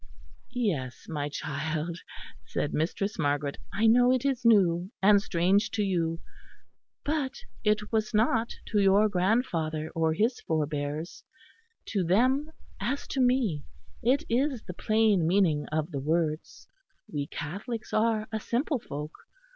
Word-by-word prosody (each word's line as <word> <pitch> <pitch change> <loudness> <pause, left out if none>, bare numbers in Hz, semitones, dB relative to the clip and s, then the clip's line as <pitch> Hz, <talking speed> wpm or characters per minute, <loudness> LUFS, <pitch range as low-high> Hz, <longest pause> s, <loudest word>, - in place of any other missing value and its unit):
"Yes, 160 - -2
my 145 -2 -3
child," 155 +3 -3 0.5
said 145 - -2
Mistress 195 +6 -1
Margaret, 145 0 0
"I 220 - 0
know 245 +2 +6
it 255 0 +1
is 265 -3 0
new 185 -6 +4
and 200 +1 +5
strange 190 +2 +2
to 210 - +2
you; 165 -4 0 0.8
but 290 -3 -1 0.3
it 210 -1 +1
was 220 -1 0
not 225 +1 +2 0.2
to 210 - +2
your 200 +2 +5
grandfather 180 -6 0
or 160 -1 +1
his 230 +7 +1
forbears: 150 +1 -3 0.7
to 200 -4 0
them, 255 - +2 0.3
as 280 - -2
to 270 - 0
me, 245 - +2 0.4
it 265 +7 +2
is 255 0 0
the 180 - -7
plain 215 -4 +2
meaning 170 -5 +2
of 155 +2 -2
the 140 - -3
words. 155 +1 -2 0.4
We 145 -2 -3
Catholics 210 +11 -6
are 220 0 +2
a 220 - -1
simple 250 +5 -1
folk. 150 -5 -6
195 Hz, 135 wpm, -28 LUFS, 160-230 Hz, 0.8 s, know